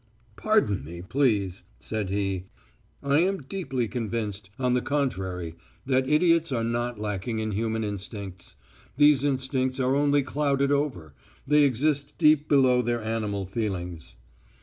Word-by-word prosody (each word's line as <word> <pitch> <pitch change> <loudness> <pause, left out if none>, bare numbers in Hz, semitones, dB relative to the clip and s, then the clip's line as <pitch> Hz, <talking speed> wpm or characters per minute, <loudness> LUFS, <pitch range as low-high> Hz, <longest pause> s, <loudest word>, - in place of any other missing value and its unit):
"Pardon 210 - +1
me, 85 +4 -8
please," 100 -6 +1 0.2
said 110 -4 -3
he. 95 -2 -1 0.6
"I 140 +1 +3
am 190 -2 +1
deeply 135 -7 -3
convinced, 105 -3 -3
on 125 -2 +1
the 125 - +2
contrary, 95 - -2 0.3
that 130 0 +1
idiots 165 0 +3
are 115 -3 0
not 120 0 -2
lacking 105 +2 -3
in 110 0 -2
human 110 +2 -1
instincts. 100 -2 -6 0.4
These 145 -2 +5
instincts 130 -1 0
are 130 +1 +2
only 145 0 +3
clouded 140 0 0
over... 130 - -1 0.3
they 150 +1 +5
exist 140 +2 0
deep 150 -1 +4
below 130 -3 +5
their 120 -1 -1
animal 105 -3 -2
feelings. 90 - -4
120 Hz, 135 wpm, -26 LUFS, 100-140 Hz, 0.6 s, These